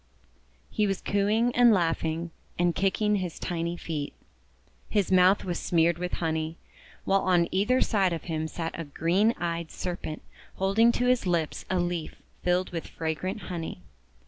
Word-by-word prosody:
He 210 - +1
was 195 -1 -1
cooing 215 +4 +1
and 245 -1 +7
laughing, 165 -3 0 0.3
and 175 0 +2
kicking 205 +3 +1
his 180 -4 -4
tiny 170 -1 -3
feet. 150 -4 -4 0.8
His 205 -4 +1
mouth 185 +1 +5
was 175 -2 -2
smeared 170 0 +2
with 180 0 -3
honey, 160 0 -2 0.5
while 195 0 +3
on 175 -2 +3
either 210 +7 +2
side 195 -5 +2
of 165 - -3
him 160 -2 -2
sat 165 0 -4
a - - -2
green 175 +10 +2
eyed 170 -3 -3
Serpent 175 -4 -5 0.3
hold 195 +3 0
ing 230 +1 +7
to 245 - 0
his 250 -5 +2
lips 170 -3 -1
a 185 - +1
leaf 175 -2 -2 0.3
filled 180 +1 +1
with 165 -2 -4
fragrant 165 +6 -3
honey. 165 - -6
175 Hz, 160 wpm, -27 LUFS, 165-195 Hz, 0.8 s, and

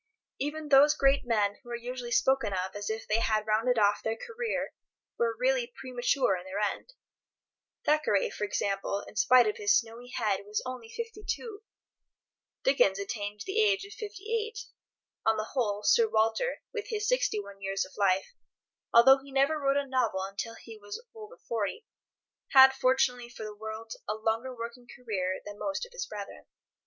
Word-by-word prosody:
Even 295 +2 -3
those 290 +2 +7
great 275 -2 +3
men 205 -3 +1
who 240 - -15
are 240 - -3
usually 245 +1 -6
spoken 265 -4 +2
of 185 0 -2
as 205 0 -4
if 220 0 -4
they 215 +1 +2
had 215 -2 +1
rounded 225 +3 +2
off 205 -1 +3
their 225 0 -2
career 460 - -3 0.5
were 470 -1 +1
really - - +1
premature 250 -3 +1
in 180 - -6
their 190 +1 -6
end. 210 - -2 0.9
Thackeray, 300 -10 +2
for - - -5
example, 200 -1 -1
in - - -13
spite 250 +4 +6
of 425 +2 -1
his 410 -2 +4
snowy 230 +1 -5
head, 215 -6 0
was 210 +1 -2
only 255 -3 -6
52; 450 - -5 1.0
Dickens - - +4
attained 210 - -4
the 410 +3 +1
age 405 -2 +2
of 405 - -11
58; 440 +1 -4 0.6
on 220 0 +3
the 215 +1 -3
whole, 210 -6 0
Sir 460 - +4
Walter, 225 - +1
with 430 -3 -4
his 425 -2 -2
61 205 - -1
years 195 0 -1
of - - -15
life, 195 - +1 0.6
although 265 +4 +8
he 275 0 -14
never 275 +3 +2
wrote 275 -1 +2
a 285 - 0
novel 255 -8 0
until 200 +4 -5
he 225 -2 -12
was 205 0 -7
over 445 +2 -11
40, 230 - -3 0.7
had, 265 -1 +9
fortunately 255 -2 +1
for 240 -2 -9
the 215 -1 -6
world, 220 +1 -7 0.2
a 215 - 0
longer 225 +4 -1
working 235 +1 -7
career 195 -8 -3
than 205 0 -9
most 295 +10 -2
of 485 - -17
his - - -4
brethren. - - -8
245 Hz, 170 wpm, -29 LUFS, -, 1.0 s, had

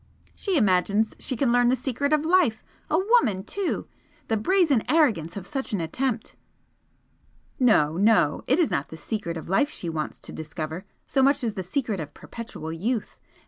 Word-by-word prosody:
"She 385 -5 -1
imagines 205 0 +2
she 260 - -3
can 260 -2 +2
learn 245 0 +4
the 255 - +4
secret 275 +2 -2
of 305 0 +2
life! 330 -10 +3 0.3
A 310 - +2
woman, 375 - +3
too! 385 - -3 0.4
The 225 - +2
brazen 315 - +3
arrogance 215 - +2
of 190 - -6
such 265 +2 -3
an 200 - 0
attempt!" 220 +9 -2 1.2
"No, 170 - +4
no! 200 -7 +3
It 270 - +3
is 340 -4 +2
not 140 - -1
the 160 - -10
secret 170 -3 -4
of 160 - -8
life 195 - +2
she 175 - -4
wants 155 -2 -4
to - - -9
discover 155 +3 -6 0.2
so 270 - +1
much 275 +1 +3
as 225 -3 -1
the 190 - -4
secret 210 +2 -2
of 145 -2 -7
perpetual 190 -9 -7
youth! 220 +7 -3
225 Hz, 180 wpm, -25 LUFS, 180-280 Hz, 1.2 s, learn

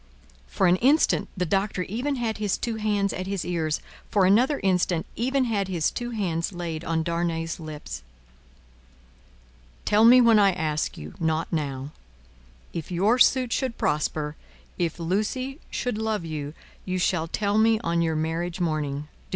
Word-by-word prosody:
For - - 0
an 180 +1 +5
instant, 280 +9 +3
the 180 - 0
Doctor 195 +1 0
even 245 +10 -2
had 230 -4 -2
his 210 -2 0
two 230 -2 -3
hands 205 -2 0
at 185 0 -4
his 195 -2 -2
ears; 160 -3 -1 0.3
for 200 -3 +3
another 245 +10 +4
instant, 180 -3 +1
even 260 +3 +1
had 210 -5 0
his 175 -4 0
two 240 0 -4
hands 180 -8 -1
laid 170 -3 -5
on 160 -1 0
Darnay's 170 -1 -2
lips. 150 - -7 1.8
"Tell 210 +1 +4
me 245 +2 +9
when 230 -3 +6
I 200 -2 +5
ask 155 -3 -2
you, 75 +1 -8
not 160 0 -1
now. 140 -3 -2 0.8
If 165 +1 -5
your 205 +8 +2
suit 255 -2 +4
should 260 -4 -1
prosper, 150 0 -1 0.4
if 170 -3 -1
Lucie 215 - -2
should 245 -3 -2
love 220 -5 -1
you, 150 -1 -5 0.3
you 185 0 -2
shall 175 -2 +1
tell 205 +4 0
me 220 0 +4
on 170 -5 0
your 165 -1 +1
marriage 165 +3 -2
morning. 150 -4 -1
180 Hz, 160 wpm, -25 LUFS, 160-220 Hz, 1.8 s, me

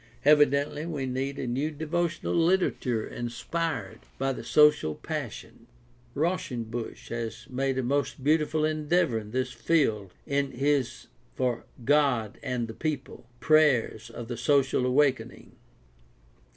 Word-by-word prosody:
Evidently 145 0 +4
we 155 -5 -3
need 135 +2 -3
a - - -3
new 130 +5 -1
devotional 165 +2 -2
literature 165 -9 +1
inspired 120 - -4 0.2
by 135 0 0
the - - -7
social 150 - +4
passion. - - -6 0.5
Rausch 170 +2 0
enbusch 115 -1 -5
has 115 -1 -5
made 135 +1 -1
a 130 - 0
most 140 +1 -1
beautiful 155 +1 +2
endeavor 155 -4 +1
in 105 -1 -10
this 130 +2 -1
field 110 - +1
in 140 -1 -1
his 135 -2 0 0.3
For 125 -2 -1 0.2
God 135 -7 +2
and 125 -4 -2
the 110 - -7
People: 140 -4 -4
Prayers 140 -7 +3
of 120 - -8
the 120 -1 -5
Social 135 0 +2
Awakening. 135 +1 +1
135 Hz, 125 wpm, -28 LUFS, 120-150 Hz, 0.5 s, Evidently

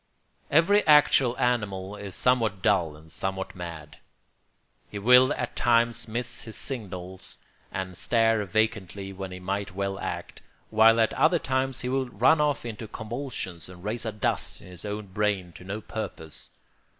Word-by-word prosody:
] - - -43
Every 185 +7 +5
actual 140 -4 +6
animal 105 -5 -1
is 100 -3 -7
somewhat 115 -4 +2
dull 90 -8 +2
and 80 +1 -16
somewhat 95 +3 -3
mad. 85 -4 -8 0.9
He 105 - -6
will 125 +5 +6
at - - -4
times 115 -1 +2
miss 120 +2 -3
his 110 - -8
signals 95 -7 -5 0.3
and 95 -1 -4
stare 115 +2 +2
vacantly 100 -1 -1
when 95 0 -6
he 90 - -7
might 100 +1 -3
well 100 0 -2
act, - - -5 0.3
while 110 +1 +6
at 110 - +3
other 165 +3 +4
times 130 -3 -1
he 125 - -3
will 130 -1 0
run 130 +8 +4
off 145 -4 +1
into 110 -1 -6
convulsions 110 - -5
and 90 -1 -12
raise 110 +3 -2
a 110 - -2
dust 105 -1 -1
in - - -15
his 90 +2 -9
own 105 0 -4
brain 100 -2 -1
to 90 - -13
no 100 +4 -5
purpose. 90 -8 -6
105 Hz, 160 wpm, -27 LUFS, 95-120 Hz, 0.9 s, actual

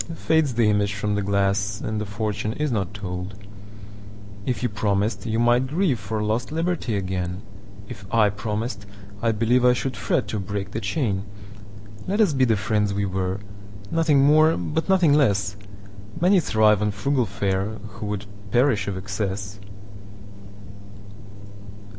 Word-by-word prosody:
Fades 160 -6 +1
the 115 -2 +3
image 105 -1 +1
from 105 +1 -1
the 100 - 0
glass, 100 +1 0
And 110 -1 -3
the 105 - -4
fortune 105 +1 -2
is 150 +2 -1
not 100 -5 -1
told. 95 -1 -6 1.1
If 125 0 -1
you - - +3
promised, 105 0 -1
you 110 0 0
might 120 +2 +3
grieveFor 120 - -1
lost 115 +5 -1
liberty 165 -7 -1
again:If 100 +2 -6
I 110 -3 +4
promised, 105 0 -4 0.3
I 115 - +2
believeI 125 +3 +3
should 130 +1 -3
fret 120 -6 0
to 105 - -2
break 100 +1 -4
the 110 - -3
chain. 105 -2 -1 0.8
Let 205 +3 0
us 200 -8 +4
be 130 -1 +3
the 115 -3 +3
friends 105 -1 0
we 100 0 0
were, 95 +1 -2 0.5
Nothing 155 -4 +3
more 155 +2 +5
but 155 - -2
nothing 180 -6 +5
less:Many 100 - 0
thrive 110 - +3
on 105 - +1
frugal 120 +5 0
fareWho 100 +1 -3
would 105 -1 -3 0.2
perish 120 -3 +2
of 100 -2 -3
excess. 100 +1 -4
105 Hz, 140 wpm, -24 LUFS, 100-125 Hz, 1.1 s, more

